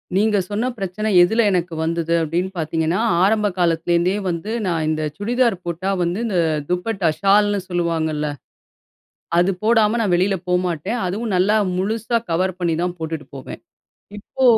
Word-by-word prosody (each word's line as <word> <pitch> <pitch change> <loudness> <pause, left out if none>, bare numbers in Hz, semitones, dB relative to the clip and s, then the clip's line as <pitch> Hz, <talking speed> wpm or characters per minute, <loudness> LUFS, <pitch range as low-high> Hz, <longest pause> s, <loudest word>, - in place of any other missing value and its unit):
நீங்க 210 +1 +3
சொன்ன 220 +5 -1
பிரச்சனை 200 +2 -3
எதில 220 +6 +2
எனக்கு 180 -2 -1
வந்தது 165 0 -1
அப்படின்னு 170 +4 -1
பார்த்தீங்கன்னா, 160 +3 0 0.2
ஆரம்ப 210 +1 +3
காலத்துலேருந்தே 170 +2 +2
வந்து 175 +5 -3
நான் 165 -4 0
இந்த 155 0 -1
சுடிதார் 235 +1 +1
போட்டா 175 +3 -3
வந்து 175 +5 -1
இந்த 190 -5 0 0.3
துப்பட்டா, 180 -1 0
ஷால்ன்னு 205 0 +3
சொல்லுவாங்கள்ல, 160 -3 -1 1.1
அது 180 +2 +4
போடாம 225 0 +3
நான் 195 -5 +2
வெளில 190 +2 +2
போமாட்டேன். 180 +4 -1
அதுவும் 205 +3 -2
நல்லா 200 +4 +3 0.2
முழுசா 225 +5 0
கவர் 185 +2 0
பண்ணி 170 -2 +1
தான் 180 0 -2
போட்டுட்டு 160 -2 -4
போவேன். 130 - -9 0.6
இப்போ 260 +5 -5
180 Hz, 140 wpm, -20 LUFS, 170-210 Hz, 1.1 s, அது